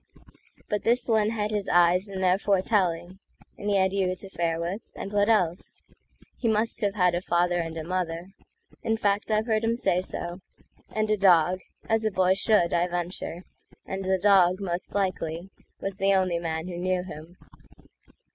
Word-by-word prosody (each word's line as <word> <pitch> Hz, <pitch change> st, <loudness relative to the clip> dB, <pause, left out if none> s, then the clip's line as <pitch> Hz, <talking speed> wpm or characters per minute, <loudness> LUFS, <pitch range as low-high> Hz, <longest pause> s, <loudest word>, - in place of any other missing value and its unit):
But 210 Hz, -1 st, -1 dB
this 240 Hz, +1 st, +2 dB
one 220 Hz, -2 st, +3 dB
had 215 Hz, -1 st, -2 dB
his 205 Hz, -2 st, -2 dB
eyes 175 Hz, +3 st, +4 dB
and 190 Hz, -1 st, -4 dB
their 185 Hz, +1 st, +3 dB
foretelling, 185 Hz, -3 st, 0 dB, 0.4 s
And 205 Hz, -, -4 dB
he 205 Hz, -, +2 dB
had 190 Hz, 0 st, +2 dB
you 185 Hz, -2 st, 0 dB
to 195 Hz, +2 st, -9 dB
fare 165 Hz, -2 st, -1 dB
with, 175 Hz, +6 st, -3 dB
and 200 Hz, -, -6 dB
what 205 Hz, +1 st, +2 dB
else? 180 Hz, -6 st, 0 dB, 0.6 s
He 240 Hz, -, -1 dB
must 220 Hz, +1 st, +1 dB
have 200 Hz, -1 st, 0 dB
had 180 Hz, -3 st, +3 dB
a 175 Hz, -, -1 dB
father 175 Hz, 0 st, +1 dB
and 165 Hz, -1 st, -4 dB
a 160 Hz, -, -4 dB
mother—In 185 Hz, +5 st, -5 dB
fact 205 Hz, 0 st, 0 dB
I've 215 Hz, 0 st, +1 dB
heard 220 Hz, -1 st, 0 dB
him 230 Hz, +1 st, +1 dB
say 180 Hz, -7 st, +1 dB
so—and 190 Hz, +4 st, -6 dB
a 215 Hz, -, +3 dB
dog, 180 Hz, -2 st, +4 dB, 0.3 s
As 225 Hz, 0 st, +1 dB
a 215 Hz, -, +2 dB
boy 185 Hz, -2 st, +3 dB
should, 195 Hz, -3 st, +2 dB
I 175 Hz, +1 st, +2 dB
venture; 175 Hz, 0 st, -4 dB, 0.4 s
and 195 Hz, 0 st, -4 dB
the 190 Hz, 0 st, +1 dB
dog, 185 Hz, -1 st, +4 dB
Most 180 Hz, -1 st, -4 dB
likely, 185 Hz, -2 st, -2 dB, 0.3 s
was 195 Hz, -1 st, -4 dB
the 195 Hz, 0 st, +3 dB
only 185 Hz, -3 st, +1 dB
man 160 Hz, 0 st, -3 dB
who 175 Hz, -1 st, -6 dB
knew 185 Hz, 0 st, 0 dB
him. 170 Hz, 0 st, -10 dB
185 Hz, 175 wpm, -26 LUFS, 175-205 Hz, 0.6 s, eyes